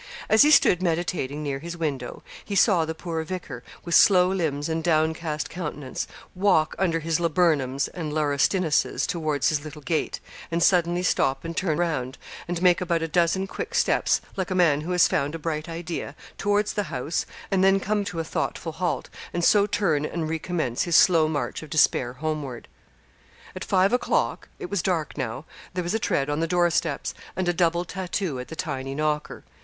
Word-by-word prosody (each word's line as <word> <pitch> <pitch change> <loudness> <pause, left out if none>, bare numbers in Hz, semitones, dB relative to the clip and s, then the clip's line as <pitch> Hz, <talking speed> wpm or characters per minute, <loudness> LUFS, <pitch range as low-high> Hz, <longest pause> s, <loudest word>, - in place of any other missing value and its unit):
As 220 - +6
he 295 - +7
stood 185 - +5
meditating 165 -4 -1
near 140 -2 -2
his 170 +3 -7
window, 140 -7 -4 0.2
he 200 - -5
saw 185 -5 +4
the 160 0 -4
poor 165 -1 -4
vicar, 185 +3 -6 0.2
with 170 - -3
slow 180 -1 +6
limbs 155 -6 -1
and 160 0 -2
downcast 160 -1 0
countenance, 150 -6 -5 0.3
walk 180 -5 +2
under 165 -4 +1
his 165 +1 0
laburnums 155 -6 +1
and 160 -4 -5
laurustinuses 150 +3 +1
towards 155 -5 0
his 150 -2 -1
little 150 -1 -9
gate, 160 0 -1 0.3
and 170 0 0
suddenly 175 -1 +3
stop 135 -5 +1
and 165 0 -5
turn 160 -4 0
round, 135 -7 -1 0.3
and 175 0 -3
make 180 -1 +5
about 170 -2 0
a - - -1
dozen 175 +4 +1
quick 445 - -6
steps, - - +2
like 190 -2 -2
a 185 - -1
man 160 -5 +3
who 170 +4 -4
has 180 -1 +5
found 145 +3 -1
a - - -3
bright 155 0 -3
idea, 165 -3 -5 0.2
towards 205 +1 +1
the 205 - -1
house, 145 +7 -2 0.2
and 190 -1 +2
then 195 0 +5
come 205 +1 0
to 175 -3 -4
a - - 0
thoughtful 165 +1 -3
halt, 175 +1 -2 0.3
and 175 -1 +1
so 205 -1 +5
turn 170 -8 +1
and 160 0 -3
recommence 160 -6 -2
his 175 -2 +1
slow 165 -3 +6
march 155 -2 -3
of 155 - -10
despair 130 -5 +2
homeward. 150 -3 -4 0.9
At - - -5
five 190 +3 +2
o'clock 250 - 0
it 180 - -7
was 200 -3 0
dark 170 -4 -1
now 130 +1 -4 0.3
there 180 - -1
was 175 - -2
a 220 - +1
tread 140 -9 0
on 145 +1 -1
the 165 - 0
door 175 0 +2
steps, - - -1 0.2
and 185 0 -1
a 175 - +2
double 170 0 +1
tattoo 180 -5 -3
at 125 - -6
the 160 - -8
tiny 135 -6 -4
knocker. 150 0 -2
165 Hz, 190 wpm, -25 LUFS, 150-180 Hz, 0.9 s, he